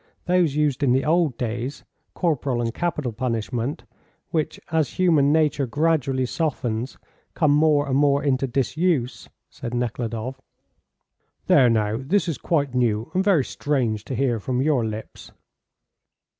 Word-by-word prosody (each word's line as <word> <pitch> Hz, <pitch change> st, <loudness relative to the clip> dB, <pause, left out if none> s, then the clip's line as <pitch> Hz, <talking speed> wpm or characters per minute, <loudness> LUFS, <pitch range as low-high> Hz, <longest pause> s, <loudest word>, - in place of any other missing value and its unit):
Those 175 Hz, -5 st, +2 dB
used 150 Hz, -3 st, +1 dB
in 130 Hz, -3 st, +3 dB
the 130 Hz, +1 st, +1 dB
old 160 Hz, -5 st, +2 dB
days: 120 Hz, +3 st, -4 dB, 0.3 s
corporal 145 Hz, -7 st, 0 dB
and 115 Hz, -1 st, -1 dB
capital 150 Hz, -6 st, -2 dB
punishment, 120 Hz, +4 st, -3 dB, 0.5 s
which, 155 Hz, -2 st, -1 dB
as 160 Hz, -3 st, +1 dB
human 160 Hz, -6 st, +3 dB
nature 150 Hz, -3 st, +2 dB
gradually 140 Hz, -2 st, +1 dB
softens, 125 Hz, -5 st, -2 dB, 0.4 s
come 155 Hz, -4 st, +3 dB
more 150 Hz, -1 st, +3 dB
and 130 Hz, -, 0 dB
more 140 Hz, 0 st, +3 dB
into 135 Hz, -1 st, +1 dB
disuse," 135 Hz, +1 st, -1 dB, 0.2 s
said 120 Hz, 0 st, -6 dB
Nekhludoff. 120 Hz, +1 st, -3 dB, 1.0 s
"There, 125 Hz, -, +5 dB
now, 110 Hz, -1 st, +1 dB
this 175 Hz, +8 st, 0 dB
is 160 Hz, -7 st, -3 dB
quite 145 Hz, -6 st, 0 dB
new 120 Hz, 0 st, 0 dB
and 185 Hz, -, +1 dB
very 185 Hz, -10 st, +3 dB
strange 120 Hz, -8 st, -1 dB
to 130 Hz, -, -4 dB
hear 120 Hz, -3 st, 0 dB
from 125 Hz, +4 st, -2 dB
your 135 Hz, -3 st, +2 dB
lips." 110 Hz, 0 st, -7 dB
135 Hz, 140 wpm, -23 LUFS, 120-155 Hz, 1.0 s, There